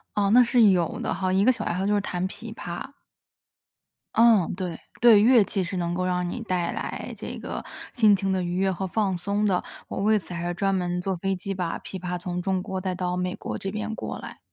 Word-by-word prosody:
哦， 200 Hz, -1 st, +2 dB
那 250 Hz, -, +8 dB
是 240 Hz, 0 st, +4 dB
有 175 Hz, -3 st, +1 dB
的 -, -, -1 dB
哈， 185 Hz, +1 st, -1 dB
一 195 Hz, +2 st, +3 dB
个 255 Hz, -, +6 dB
小 255 Hz, -, -1 dB
爱 -, -, -1 dB
好 185 Hz, +2 st, -1 dB
就 205 Hz, -, +2 dB
是 205 Hz, -, +2 dB
弹 185 Hz, -2 st, -2 dB
琵 220 Hz, +3 st, -9 dB
琶。 180 Hz, +9 st, -7 dB, 1.2 s
嗯， 225 Hz, -6 st, +5 dB
对。 180 Hz, -3 st, -4 dB, 0.2 s
对， 230 Hz, -3 st, +8 dB
乐 230 Hz, -1 st, +6 dB
器 195 Hz, -1 st, -1 dB
是 180 Hz, +2 st, -4 dB
能 170 Hz, -1 st, -1 dB
够 185 Hz, +1 st, -1 dB
让 180 Hz, -1 st, 0 dB
你 245 Hz, -, -5 dB
带 185 Hz, -6 st, -1 dB
来 -, -, -5 dB
这 -, -, -6 dB
个 -, -, -5 dB, 0.3 s
心 215 Hz, -4 st, +5 dB
情 195 Hz, 0 st, -1 dB
的 190 Hz, -1 st, 0 dB
愉 175 Hz, 0 st, -2 dB
悦 190 Hz, +1 st, +2 dB
和 190 Hz, +1 st, -3 dB
放 190 Hz, -1 st, 0 dB
松 200 Hz, +4 st, -1 dB
的， 185 Hz, -3 st, +2 dB, 0.3 s
我 -, -, -5 dB
为 215 Hz, +1 st, +4 dB
此 185 Hz, -, -10 dB
还 175 Hz, 0 st, -3 dB
专 195 Hz, +2 st, +1 dB
门 180 Hz, -1 st, -1 dB
坐 190 Hz, +1 st, -1 dB
飞 195 Hz, +2 st, -1 dB
机 195 Hz, +2 st, -4 dB
把 180 Hz, -3 st, -2 dB
琵 190 Hz, -, -7 dB
琶 180 Hz, 0 st, -3 dB
从 180 Hz, 0 st, -4 dB
中 190 Hz, 0 st, -1 dB
国 190 Hz, 0 st, -4 dB
带 185 Hz, -1 st, -2 dB
到 180 Hz, 0 st, -2 dB
美 180 Hz, +1 st, -1 dB
国 -, -, -5 dB
这 195 Hz, -, -4 dB
边 215 Hz, +2 st, -4 dB
过 -, -, -5 dB
来。 -, -, -9 dB
190 Hz, 255 characters per minute, -25 LUFS, 180-205 Hz, 1.2 s, 那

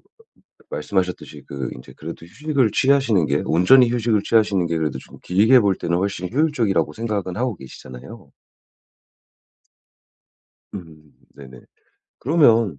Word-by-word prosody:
그 455 Hz, -1 st, -31 dB
말씀하셨듯이 90 Hz, -2 st, -3 dB
그 70 Hz, -3 st, -5 dB
인제 65 Hz, -, -13 dB
그래도 -, -, -9 dB
휴식을 140 Hz, -, -1 dB
취하시는 130 Hz, -, +2 dB
게 -, -, 0 dB
온전히 115 Hz, +9 st, +4 dB
휴식을 115 Hz, -3 st, 0 dB
취하시는 105 Hz, -5 st, +1 dB
게 85 Hz, 0 st, -2 dB
그래도 75 Hz, -4 st, -2 dB
좀 -, -, -15 dB
길게 110 Hz, +8 st, +4 dB
볼 100 Hz, -3 st, +2 dB
때는 85 Hz, 0 st, -2 dB
훨씬 95 Hz, -2 st, -3 dB
효율적이라고 115 Hz, -, 0 dB
생각은 105 Hz, -4 st, -4 dB
하고 120 Hz, -4 st, -2 dB
계시잖아요. 65 Hz, -2 st, -12 dB, 2.4 s
음. 80 Hz, -5 st, -12 dB, 0.2 s
네네. 65 Hz, -3 st, -13 dB, 0.6 s
그러면 115 Hz, -, +2 dB
100 Hz, 305 characters per minute, -21 LUFS, 80-120 Hz, 2.4 s, 온전히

